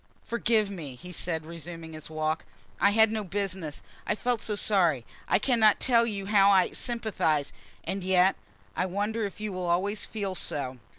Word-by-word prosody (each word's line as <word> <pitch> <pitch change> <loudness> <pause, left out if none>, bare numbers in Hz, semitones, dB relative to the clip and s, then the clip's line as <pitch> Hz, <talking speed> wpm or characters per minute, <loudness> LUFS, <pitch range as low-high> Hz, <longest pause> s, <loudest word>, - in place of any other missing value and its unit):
"Forgive 225 -3 +1
me," 155 -9 -7
he 180 +8 -10
said, 165 -2 -2
resuming 165 0 -8
his 155 -1 -7
walk. 155 0 -1 0.4
"I 200 - +5
had 220 +1 +5
no 220 -1 -2
business 190 -5 -3 0.2
I - - +1
felt 240 0 -1
so 210 - -1
sorry 175 - +2 0.2
I - - +4
cannot 220 -2 +4
tell 235 -2 +4
you 200 -3 -3
how 200 -1 +5
I 190 -2 +4
sympathize! 195 - -1 0.3
And 195 -1 -3
yet 185 0 +4 0.4
I 185 - 0
wonder 205 +3 -1
if 200 - -12
you 210 -2 -3
will 185 -1 -3
always 200 +5 0
feel 200 -3 -3
so?" 130 -7 -4
195 Hz, 175 wpm, -28 LUFS, 165-215 Hz, 0.4 s, I